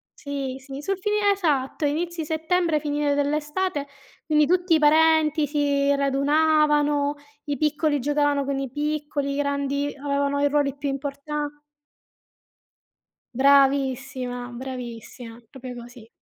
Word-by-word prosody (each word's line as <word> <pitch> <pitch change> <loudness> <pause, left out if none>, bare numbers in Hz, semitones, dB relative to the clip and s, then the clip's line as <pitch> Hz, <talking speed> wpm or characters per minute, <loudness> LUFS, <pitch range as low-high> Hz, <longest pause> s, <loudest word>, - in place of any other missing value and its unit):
sì, 275 -2 -5
sì, 270 +1 -8
sul 390 +5 -2
finir 420 +2 -1
esatto, 300 -7 0
inizi 330 +3 -2
settembre, 320 0 0
finire 290 -1 0
dell'estate. 295 +2 -1 0.4
Quindi, 300 -1 +3
tutti 360 -1 +2
i 315 - +3
parenti 310 0 +4
si 285 -1 +1
radunavano: 295 +1 +2 0.3
i 285 -2 -2
piccoli 300 0 +1
giocavano 290 +1 +1
con 275 -1 -2
i 270 - -3
piccoli, 295 -1 -2
i - - -3
grandi 280 0 -1
avevano 280 0 0
i 285 - +4
ruoli 285 -2 +1
più 280 0 -3
importa 285 +2 -4 1.9
Bravissima, 265 -2 +2
bravissima, 240 -2 -8
proprio 255 -1 -8
così. 240 -1 -12
285 Hz, 120 wpm, -24 LUFS, 275-305 Hz, 1.9 s, parenti